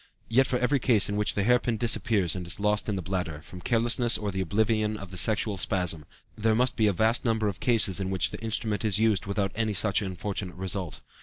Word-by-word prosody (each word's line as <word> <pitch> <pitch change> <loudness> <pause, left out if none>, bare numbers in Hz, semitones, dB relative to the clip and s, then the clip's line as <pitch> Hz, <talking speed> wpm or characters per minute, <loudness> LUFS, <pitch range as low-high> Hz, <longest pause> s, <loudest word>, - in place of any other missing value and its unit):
Yet 130 +4 +3
for 125 - 0
every 130 +3 +1
case 115 -5 +3
in 100 - -2
which 105 0 0
the 100 - 0
hair 125 +3 +4
pin 120 -2 -2
disappears 105 -6 +1
and 90 -2 -6
is 85 - -3
lost 105 +1 0
in 105 - -1
the 95 - -4
bladder, 90 -5 -3
from 90 +2 -11
carelessness 120 +1 +2
or 105 -1 -3
the 95 0 -3
oblivion 110 +3 0
of 100 -3 -10
the - - -8
sexual 105 +2 +2
spasm, 90 -5 -1 0.3
there 110 0 +1
must 125 +2 +1
be 110 - +2
a - - +3
vast 110 +5 +1
number 110 -3 0
of 100 -2 -4
cases 110 -6 +2
in 95 -1 -2
which 95 -4 0
the - - -7
instrument 110 -2 -2
is 105 -3 +1
used 110 -3 +1
without 100 -1 -1
any 110 -2 -1
such 105 +1 +1
unfortunate 95 -1 -5
result. 95 -2 -4
105 Hz, 235 wpm, -27 LUFS, 95-115 Hz, 0.3 s, hair